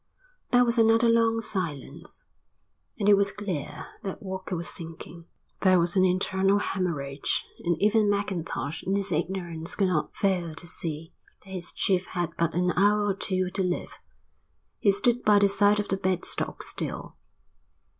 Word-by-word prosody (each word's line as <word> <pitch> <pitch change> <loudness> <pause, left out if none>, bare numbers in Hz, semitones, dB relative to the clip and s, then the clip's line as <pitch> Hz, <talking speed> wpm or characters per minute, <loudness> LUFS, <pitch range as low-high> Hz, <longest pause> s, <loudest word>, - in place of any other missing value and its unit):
There 245 0 +5
was 235 0 +1
another 225 +1 +5
long 230 0 +3
silence, 165 -6 -4 0.7
and 205 -3 -1
it 210 - +8
was 200 0 +2
clear 190 -9 -5 0.2
that 195 0 -6
Walker 190 -1 -5
was 170 0 -2
sinking. 165 0 -7 0.3
There 185 -1 +4
was 170 +2 +2
an 185 - +4
internal 190 +2 +2
hæmorrhage 150 -9 -2 0.2
and 170 -2 0
even 210 0 +3
Mackintosh 180 -7 -2
in 195 - -1
his 200 -1 +1
ignorance 170 0 -2
could 195 -2 +2
not 160 -4 -1
fail 180 -5 0
to 165 - -4
see 160 -1 -5 0.3
that 190 - -13
his 180 -2 -4
chief 185 -1 +1
had 175 -2 -2
but 165 -1 0
an 180 0 +2
hour 205 +2 +3
or - - +2
two 185 -1 -2
to 195 - -2
live. 180 -1 -3 0.8
He 200 - +4
stood 240 +4 +1
by 210 -1 +5
the 200 0 +5
side 205 +1 +4
of 210 - -2
the 195 - +1
bed 185 -1 -1
stock - - -2
still. - - -4
190 Hz, 165 wpm, -27 LUFS, 170-205 Hz, 0.8 s, it